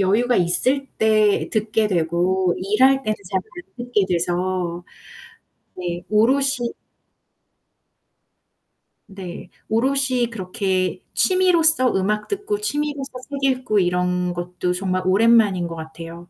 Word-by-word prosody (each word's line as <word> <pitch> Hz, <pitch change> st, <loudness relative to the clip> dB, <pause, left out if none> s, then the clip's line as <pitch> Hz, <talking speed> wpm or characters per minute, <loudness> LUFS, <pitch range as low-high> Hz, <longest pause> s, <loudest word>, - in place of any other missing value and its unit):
여유가 220 Hz, +6 st, +2 dB
있을 255 Hz, +11 st, +1 dB
때 215 Hz, -2 st, +2 dB
듣게 215 Hz, 0 st, 0 dB
되고 180 Hz, +1 st, 0 dB
일할 260 Hz, +8 st, +3 dB
때는 215 Hz, -4 st, -1 dB, 0.2 s
잘 190 Hz, -, +1 dB
안 345 Hz, -, -11 dB
듣게 210 Hz, -5 st, +1 dB
돼서. 175 Hz, 0 st, -2 dB, 0.9 s
네. 175 Hz, -1 st, -4 dB
오롯이 250 Hz, +3 st, +2 dB, 2.3 s
네. 190 Hz, -3 st, -9 dB, 0.2 s
오롯이 255 Hz, 0 st, +1 dB
그렇게 190 Hz, -2 st, -2 dB
취미로서 330 Hz, -8 st, +4 dB
음악 210 Hz, +2 st, -1 dB
듣고 410 Hz, +1 st, -2 dB
취미로서 295 Hz, -6 st, -2 dB, 0.2 s
책 280 Hz, -1 st, -6 dB
읽고 255 Hz, -5 st, 0 dB
이런 180 Hz, 0 st, 0 dB
것도 180 Hz, +1 st, -3 dB
정말 185 Hz, 0 st, -1 dB
오랜만인 200 Hz, -2 st, +3 dB
거 165 Hz, -, -7 dB
같아요. 165 Hz, +2 st, -10 dB
205 Hz, 220 characters per minute, -21 LUFS, 180-255 Hz, 2.3 s, 취미로서